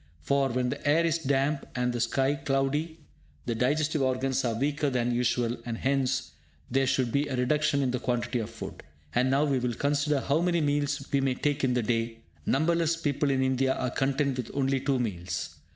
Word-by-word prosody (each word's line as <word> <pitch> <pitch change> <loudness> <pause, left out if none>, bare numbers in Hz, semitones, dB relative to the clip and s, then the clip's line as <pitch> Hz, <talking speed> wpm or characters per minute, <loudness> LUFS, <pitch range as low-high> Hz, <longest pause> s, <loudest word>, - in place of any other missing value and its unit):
For, 140 - +2
when 125 0 0
the - - -5
air 165 +3 +4
is 165 0 +1
damp 140 0 +1
and 125 0 0
the 120 - -2
sky 135 +4 +1
cloudy, 145 +3 -1 0.4
the 120 - -1
digestive 145 +6 +1
organs 130 0 0
are 115 -3 0
weaker 145 +4 0
than 120 -2 0
usual, 120 0 +1
and 115 -1 -4
hence 135 0 0 0.4
there 135 +1 +2
should 130 -2 +1
be 140 +3 +1
a 135 - -2
reduction 140 +3 +2
in 130 - +1
the 125 - -1
quantity 125 0 -1
of 110 - -4
food. - - -8 0.3
And 125 +2 +2
now 135 +2 +3
we 140 -3 +1
will 120 -1 -1
consider 145 0 +1
how 145 +5 +1
may 175 -1 +2
meals 145 -2 0
we 140 - +2
may 135 -1 +1
take 145 +1 -1
in 125 -2 +2
the 125 - +1
day. 115 0 -1 0.3
Numberless 165 +2 +2
people 145 -2 0
in 135 -1 +2
India 130 0 +1
are 125 - -2
content 135 0 0
with 125 -3 -4
only 135 -1 +1
two 135 0 0
meals. 90 -7 -3
135 Hz, 200 wpm, -28 LUFS, 125-145 Hz, 0.4 s, air